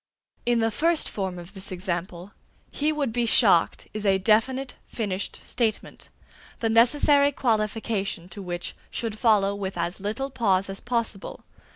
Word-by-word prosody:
In 240 Hz, -1 st, +3 dB
the 225 Hz, 0 st, +2 dB
first 330 Hz, +7 st, +2 dB
form 190 Hz, -3 st, -3 dB
of 175 Hz, +2 st, -10 dB
this 190 Hz, -1 st, -6 dB
example, 180 Hz, 0 st, -4 dB, 0.4 s
"he 300 Hz, +1 st, 0 dB
would 285 Hz, -6 st, -1 dB
be 240 Hz, -1 st, +1 dB
shocked" 195 Hz, -7 st, +3 dB
is 215 Hz, 0 st, -3 dB
a 195 Hz, -2 st, +4 dB
definite, 235 Hz, +7 st, +2 dB
finished 205 Hz, -4 st, -3 dB
statement, 225 Hz, -3 st, -2 dB, 0.5 s
the 225 Hz, -, 0 dB
necessary 285 Hz, +5 st, +5 dB
qualification 215 Hz, -6 st, -1 dB
to 200 Hz, -, -7 dB
which 175 Hz, -2 st, -5 dB
should 220 Hz, -2 st, -4 dB
follow 205 Hz, -4 st, +4 dB
with 195 Hz, -2 st, -4 dB
as 170 Hz, +2 st, -2 dB
little 220 Hz, +8 st, -3 dB
pause 195 Hz, -6 st, +1 dB
as 195 Hz, -, -5 dB
possible. 230 Hz, -5 st, -3 dB
215 Hz, 150 wpm, -25 LUFS, 190-240 Hz, 0.5 s, necessary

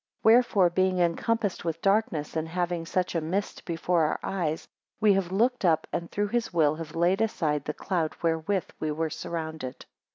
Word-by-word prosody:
8 -, -, -31 dB
Wherefore 220 Hz, -6 st, +5 dB
being 185 Hz, +1 st, +2 dB
encompassed 195 Hz, +4 st, 0 dB
with 165 Hz, -1 st, -2 dB
darkness, 195 Hz, -7 st, +1 dB
and 160 Hz, 0 st, -1 dB
having 175 Hz, -1 st, -2 dB
such 180 Hz, +1 st, 0 dB
a 165 Hz, -, 0 dB
mist 185 Hz, +6 st, -3 dB
before 170 Hz, 0 st, 0 dB
our 155 Hz, -, -1 dB
eyes, 165 Hz, -5 st, -2 dB, 0.3 s
we 210 Hz, -2 st, +5 dB
have 190 Hz, -2 st, 0 dB
looked 240 Hz, +5 st, +1 dB
up, 165 Hz, -4 st, +3 dB
and 170 Hz, 0 st, -2 dB
through 205 Hz, 0 st, -1 dB
his 240 Hz, +1 st, -1 dB
will 155 Hz, -4 st, +3 dB
have 160 Hz, 0 st, -7 dB
laid 175 Hz, +5 st, +2 dB
aside 155 Hz, -10 st, 0 dB
the 150 Hz, -, -2 dB
cloud 170 Hz, -5 st, -1 dB
wherewith 165 Hz, +3 st, 0 dB
we 155 Hz, -, -1 dB
were 160 Hz, +1 st, -2 dB
surrounded. 160 Hz, -7 st, -5 dB
170 Hz, 185 wpm, -27 LUFS, 160-195 Hz, 0.3 s, Wherefore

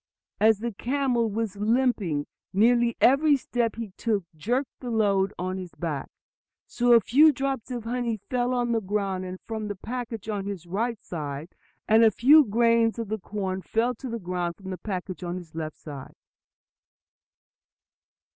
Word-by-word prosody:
"As 220 Hz, 0 st, +5 dB
the 235 Hz, +3 st, -3 dB
camel 245 Hz, +1 st, 0 dB
was 215 Hz, -1 st, -3 dB
limping, 210 Hz, -, +1 dB, 0.3 s
nearly 235 Hz, +3 st, +3 dB
every 285 Hz, +3 st, +5 dB
step 240 Hz, -3 st, -1 dB
he 225 Hz, -3 st, -6 dB
took 215 Hz, -5 st, 0 dB
jerked 245 Hz, -, -2 dB
the 250 Hz, -, -6 dB
load 200 Hz, -4 st, +2 dB
on 185 Hz, +1 st, -3 dB
his 180 Hz, -2 st, -9 dB
back. 155 Hz, -6 st, -4 dB, 0.6 s
So 245 Hz, 0 st, +2 dB
a 235 Hz, -, +9 dB
few 285 Hz, +9 st, +6 dB
drops 270 Hz, -3 st, -3 dB
of 245 Hz, -3 st, -4 dB
the 230 Hz, -, -6 dB
honey 240 Hz, -3 st, -1 dB
fell 245 Hz, +3 st, -2 dB, 0.2 s
to 240 Hz, -, -1 dB
the 225 Hz, -1 st, +1 dB
ground 190 Hz, -2 st, -2 dB
from 220 Hz, -2 st, -4 dB
the 205 Hz, -, -4 dB
package 230 Hz, +1 st, -6 dB
on 205 Hz, -2 st, -3 dB
his 195 Hz, -4 st, -5 dB
right 220 Hz, +6 st, -2 dB
side, 150 Hz, -1 st, -5 dB, 0.4 s
and 220 Hz, +1 st, +6 dB
a 225 Hz, -, +8 dB
few 285 Hz, +9 st, +6 dB
grains 230 Hz, 0 st, +2 dB
of 230 Hz, -3 st, -4 dB
the 220 Hz, 0 st, -2 dB
corn 190 Hz, -1 st, -3 dB
fell 230 Hz, +5 st, 0 dB
to 250 Hz, +2 st, -8 dB
the 230 Hz, -, -3 dB
ground 175 Hz, -3 st, -3 dB
from 190 Hz, -1 st, -8 dB
the 185 Hz, -, -5 dB
package 185 Hz, -2 st, -5 dB
on 175 Hz, 0 st, -3 dB
his 170 Hz, -3 st, -11 dB
left 155 Hz, -1 st, -5 dB
side." 140 Hz, -4 st, -9 dB
220 Hz, 170 wpm, -26 LUFS, 185-240 Hz, 0.6 s, a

